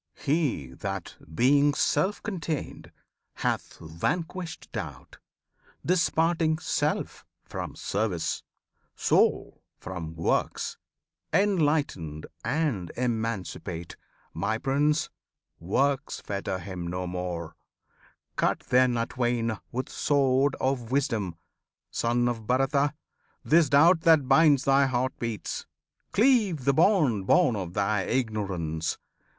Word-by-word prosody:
He 140 Hz, -, 0 dB
that, -, -, -5 dB, 0.2 s
being 140 Hz, -, +4 dB
self 195 Hz, +6 st, +1 dB
contained, 165 Hz, -8 st, -4 dB, 0.4 s
hath -, -, -2 dB
vanquished 165 Hz, -, -4 dB
doubt, -, -, -7 dB, 0.7 s
Disparting 165 Hz, -2 st, +2 dB
self -, -, -1 dB, 0.2 s
from -, -, -6 dB
service, 90 Hz, -6 st, -2 dB, 0.5 s
soul -, -, +2 dB, 0.2 s
from 85 Hz, -3 st, -6 dB
works, 80 Hz, -, -1 dB, 0.5 s
Enlightened 150 Hz, -, +1 dB, 0.2 s
and 135 Hz, -, -1 dB
emancipate, 110 Hz, -8 st, -3 dB, 0.4 s
my 110 Hz, +2 st, -1 dB
Prince! 145 Hz, +5 st, +1 dB, 0.5 s
Works 135 Hz, +11 st, 0 dB
fetter 100 Hz, -2 st, -3 dB
him 90 Hz, -1 st, -6 dB
no 90 Hz, +1 st, -3 dB
more! 90 Hz, -2 st, -4 dB, 0.8 s
Cut -, -, +1 dB
then 125 Hz, -1 st, +4 dB
atwain 115 Hz, -1 st, -1 dB
With 130 Hz, +2 st, -3 dB
sword 135 Hz, -1 st, +2 dB
of 130 Hz, -3 st, -1 dB
wisdom, 115 Hz, -10 st, 0 dB, 0.6 s
Son 120 Hz, +1 st, +1 dB
of 115 Hz, -3 st, -3 dB
Bharata! 135 Hz, +3 st, +2 dB, 0.5 s
This 165 Hz, 0 st, +4 dB
doubt 160 Hz, +4 st, +6 dB
that 160 Hz, -5 st, +5 dB
binds 140 Hz, 0 st, +5 dB
thy 135 Hz, 0 st, +4 dB
heart 130 Hz, 0 st, 0 dB
beats! 115 Hz, -3 st, -4 dB, 0.4 s
cleave 210 Hz, -, +3 dB
the 140 Hz, -, +4 dB
bond 150 Hz, -, +3 dB
Born 165 Hz, -10 st, +4 dB
of 90 Hz, -4 st, -5 dB
thy 100 Hz, 0 st, +1 dB
ignorance! 95 Hz, -10 st, -2 dB
125 Hz, 100 wpm, -27 LUFS, 100-150 Hz, 0.8 s, doubt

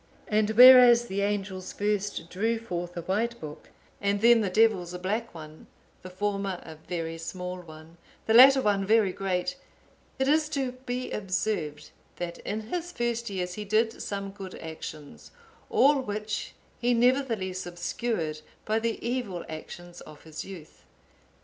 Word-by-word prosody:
And 215 Hz, -1 st, +2 dB
whereas 250 Hz, -1 st, +9 dB
the 200 Hz, -3 st, -3 dB
angels 195 Hz, -2 st, -2 dB
first 205 Hz, -3 st, -2 dB
drew 225 Hz, +5 st, 0 dB
forth 175 Hz, -6 st, -5 dB
a 170 Hz, -, -4 dB
white 225 Hz, +6 st, -1 dB
book, 150 Hz, -1 st, -9 dB, 0.3 s
and 200 Hz, 0 st, +1 dB
then 235 Hz, +1 st, +6 dB
the 200 Hz, -, 0 dB
devils 185 Hz, -4 st, +2 dB
a -, -, -3 dB
black 210 Hz, +4 st, -3 dB
one; 155 Hz, -1 st, -11 dB, 0.3 s
the 185 Hz, -, -9 dB
former 195 Hz, -1 st, -2 dB
a 160 Hz, -, -9 dB
very 165 Hz, 0 st, -5 dB
small 180 Hz, +2 st, -5 dB
one, 160 Hz, -1 st, -13 dB, 0.3 s
the 220 Hz, -, +2 dB
latter 265 Hz, +3 st, +8 dB
one 200 Hz, -2 st, +2 dB
very 215 Hz, -1 st, +3 dB
great; 180 Hz, -2 st, -2 dB, 0.6 s
it 265 Hz, -, 0 dB
is 305 Hz, +1 st, +3 dB
to 270 Hz, -4 st, -1 dB, 0.2 s
be 250 Hz, +1 st, -3 dB
observed, 185 Hz, -6 st, -2 dB, 0.2 s
that 170 Hz, -1 st, -5 dB
in 215 Hz, +2 st, -4 dB
his 345 Hz, +10 st, -4 dB
first 235 Hz, -3 st, -2 dB
years 180 Hz, -2 st, -3 dB
he 210 Hz, -, -5 dB
did 220 Hz, +2 st, 0 dB
some 200 Hz, -1 st, -4 dB
good 195 Hz, -2 st, -9 dB
actions, 155 Hz, -2 st, -9 dB, 0.4 s
all 280 Hz, 0 st, +4 dB
which 210 Hz, -2 st, -4 dB, 0.3 s
he 245 Hz, 0 st, +2 dB
nevertheless 230 Hz, -8 st, +1 dB
obscured 175 Hz, -2 st, -3 dB, 0.2 s
by 215 Hz, +1 st, +1 dB
the 230 Hz, 0 st, -1 dB
evil 235 Hz, -8 st, -3 dB
actions 175 Hz, +2 st, -9 dB
of 150 Hz, -, -13 dB
his 160 Hz, -1 st, -7 dB
youth. 175 Hz, -5 st, -11 dB
200 Hz, 155 wpm, -27 LUFS, 175-230 Hz, 0.6 s, whereas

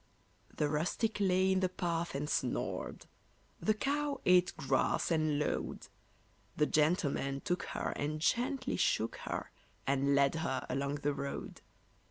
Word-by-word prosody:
The 150 Hz, -, +2 dB
rustic 170 Hz, +9 st, 0 dB
lay 190 Hz, -1 st, +3 dB
in 190 Hz, -, +3 dB
the 185 Hz, -1 st, +1 dB
path 170 Hz, -4 st, -2 dB
and 145 Hz, +2 st, -2 dB
snored; -, -, -2 dB, 0.5 s
The 215 Hz, -, +2 dB
cow 285 Hz, +3 st, -1 dB
ate 180 Hz, 0 st, +5 dB
grass 135 Hz, +5 st, +1 dB
and 155 Hz, -2 st, +2 dB
lowed; 150 Hz, -, -2 dB, 0.7 s
The 150 Hz, -, +4 dB
gentleman 150 Hz, -3 st, +1 dB
took 180 Hz, 0 st, -1 dB, 0.2 s
her -, -, -1 dB
and 150 Hz, +2 st, -2 dB
gently 255 Hz, -, 0 dB
shook -, -, +1 dB
her, -, -, -4 dB, 0.3 s
And 140 Hz, +1 st, +2 dB
led 140 Hz, 0 st, +4 dB
her 130 Hz, -5 st, -1 dB
along 140 Hz, +2 st, -1 dB
the 145 Hz, -, +3 dB
road. 140 Hz, 0 st, -5 dB
155 Hz, 140 wpm, -33 LUFS, 140-185 Hz, 0.7 s, ate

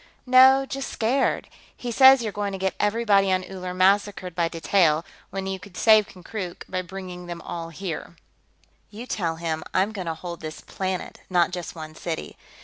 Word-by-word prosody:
"No, 260 Hz, +1 st, +7 dB
just 270 Hz, 0 st, -5 dB
scared. 255 Hz, +5 st, 0 dB, 0.3 s
He 245 Hz, -, -4 dB
says 265 Hz, +1 st, +7 dB
you're 215 Hz, -, -2 dB
going 205 Hz, -1 st, -3 dB
to -, -, -3 dB
get 190 Hz, 0 st, -1 dB
everybody 210 Hz, -2 st, +3 dB
on 185 Hz, 0 st, +1 dB
Uller 185 Hz, -1 st, -6 dB
massacred 190 Hz, 0 st, +2 dB
by 170 Hz, 0 st, +1 dB
detail, 165 Hz, -1 st, +2 dB, 0.2 s
when 195 Hz, 0 st, -4 dB
you 190 Hz, 0 st, -3 dB
could 185 Hz, 0 st, -13 dB
save 215 Hz, -2 st, +6 dB
Konkrook 185 Hz, -2 st, -7 dB
by 185 Hz, 0 st, -2 dB
bringing 180 Hz, -1 st, -8 dB
them 175 Hz, -1 st, -6 dB
all 170 Hz, -1 st, -6 dB
here." 170 Hz, 0 st, -6 dB, 0.7 s
"You 220 Hz, +4 st, -8 dB
tell 170 Hz, -9 st, -2 dB
him 160 Hz, -1 st, -3 dB
I'm 195 Hz, +3 st, +2 dB
going 190 Hz, -5 st, -6 dB
to 165 Hz, -, -2 dB
hold 170 Hz, +1 st, -7 dB
this 155 Hz, -1 st, -6 dB
planet, 190 Hz, -1 st, -4 dB
not 180 Hz, -1 st, +3 dB
just 180 Hz, -1 st, -6 dB
one 155 Hz, -1 st, -8 dB
city. 160 Hz, 0 st, -5 dB
185 Hz, 180 wpm, -25 LUFS, 175-210 Hz, 0.7 s, No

